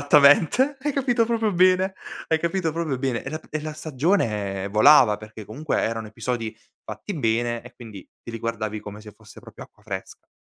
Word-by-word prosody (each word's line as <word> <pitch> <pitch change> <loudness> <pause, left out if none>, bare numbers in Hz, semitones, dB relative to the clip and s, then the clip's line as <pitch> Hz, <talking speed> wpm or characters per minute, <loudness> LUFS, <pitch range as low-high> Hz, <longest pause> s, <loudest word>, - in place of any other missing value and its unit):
esattamente, 150 - +5
hai 295 +2 -1
capito 250 -4 +1
proprio 225 -2 0
bene, 185 +1 +3 0.3
hai 160 - +2
capito 170 0 -1
proprio 160 -5 -2
bene. 130 -3 -2
E 135 - -5
la 155 +2 -5
e 155 - -3
la 155 0 -5
stagione, 125 - -1
eh, - - -3
volava 110 +1 +6
perché 110 0 -11
comunque 145 +9 -3
erano 115 -1 -2
episodi 115 0 -4 0.3
fatti 205 - -7
bene 120 -3 0
e 125 - -14
quindi 110 -6 -11
te - - -8
li 115 - -6
guardavi 110 -2 -3
come 105 +1 -9
se 105 -1 -12
fosse - - -16
proprio - - -12
acqua 105 - -25
fresca. 95 -3 -8
130 Hz, 190 wpm, -24 LUFS, 110-170 Hz, 0.3 s, volava